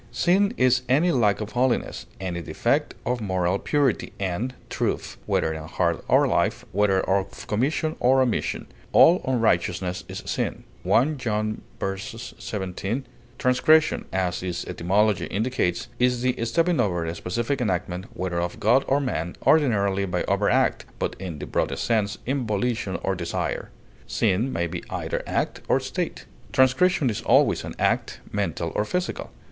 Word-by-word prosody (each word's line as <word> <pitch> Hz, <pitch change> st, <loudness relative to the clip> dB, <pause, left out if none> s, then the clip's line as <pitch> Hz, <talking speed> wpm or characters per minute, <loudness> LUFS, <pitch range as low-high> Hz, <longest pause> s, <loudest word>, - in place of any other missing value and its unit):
Sin 195 Hz, +3 st, +3 dB
is 130 Hz, -1 st, +4 dB
any 155 Hz, +7 st, +4 dB
lack 110 Hz, -7 st, +2 dB
of 105 Hz, 0 st, -5 dB
holiness, 120 Hz, -, 0 dB
any 90 Hz, -2 st, -3 dB
defect 80 Hz, -, 0 dB
of 125 Hz, 0 st, -1 dB
moral 95 Hz, -2 st, 0 dB
purity 140 Hz, -6 st, 0 dB
and 100 Hz, +7 st, -2 dB
truth, -, -, -2 dB
whether 80 Hz, -, +1 dB
in 80 Hz, 0 st, -6 dB
heart 85 Hz, 0 st, 0 dB
or -, -, +4 dB
life, -, -, 0 dB
whether 95 Hz, 0 st, +3 dB
of 95 Hz, 0 st, -1 dB
commission 150 Hz, +8 st, 0 dB
or 130 Hz, +2 st, +4 dB
omission. 125 Hz, -3 st, 0 dB, 0.3 s
"All 175 Hz, +3 st, +7 dB
unrighteousness 95 Hz, -6 st, +1 dB
is -, -, -6 dB
sin," -, -, -2 dB, 0.2 s
1 140 Hz, +4 st, +2 dB
John 110 Hz, -3 st, -1 dB, 0.2 s
v, 95 Hz, 0 st, -2 dB
17. 105 Hz, +1 st, -5 dB, 0.3 s
Transgression, 145 Hz, +5 st, +3 dB
as 90 Hz, -2 st, -1 dB
its 90 Hz, -2 st, -3 dB
etymology 100 Hz, +4 st, +1 dB
indicates, 105 Hz, -5 st, -1 dB
is 125 Hz, 0 st, +2 dB
the 125 Hz, -1 st, +2 dB
stepping 165 Hz, +7 st, +1 dB
over 90 Hz, -7 st, +1 dB
a 80 Hz, -, -3 dB
specific 120 Hz, +10 st, -2 dB
enactment, 90 Hz, -3 st, -1 dB
whether 90 Hz, -2 st, -1 dB
of 90 Hz, +5 st, -4 dB
God 120 Hz, +6 st, +4 dB
or 140 Hz, -, +3 dB
man, 90 Hz, -, -2 dB
ordinarily 100 Hz, -10 st, +3 dB
by 90 Hz, -, -1 dB
overt -, -, +1 dB
act, -, -, +2 dB
but -, -, -2 dB
in 90 Hz, -5 st, -5 dB
the -, -, -6 dB
broadest -, -, -1 dB
sense, 110 Hz, -3 st, +1 dB
in 130 Hz, -2 st, -1 dB
volition 105 Hz, -2 st, -1 dB
or 95 Hz, -, +1 dB
desire. 85 Hz, -2 st, -3 dB, 0.4 s
Sin 110 Hz, +4 st, +1 dB
may 85 Hz, +1 st, 0 dB
be 85 Hz, +1 st, -5 dB
either -, -, -3 dB
act -, -, -1 dB
or -, -, +3 dB
state; -, -, -4 dB, 0.3 s
transgression 140 Hz, +4 st, +3 dB
is 105 Hz, -, -4 dB
always -, -, +3 dB
an -, -, -7 dB
act, -, -, 0 dB
mental -, -, -2 dB
or -, -, +1 dB
physical. 180 Hz, -, -3 dB
110 Hz, 155 wpm, -25 LUFS, 95-130 Hz, 0.4 s, All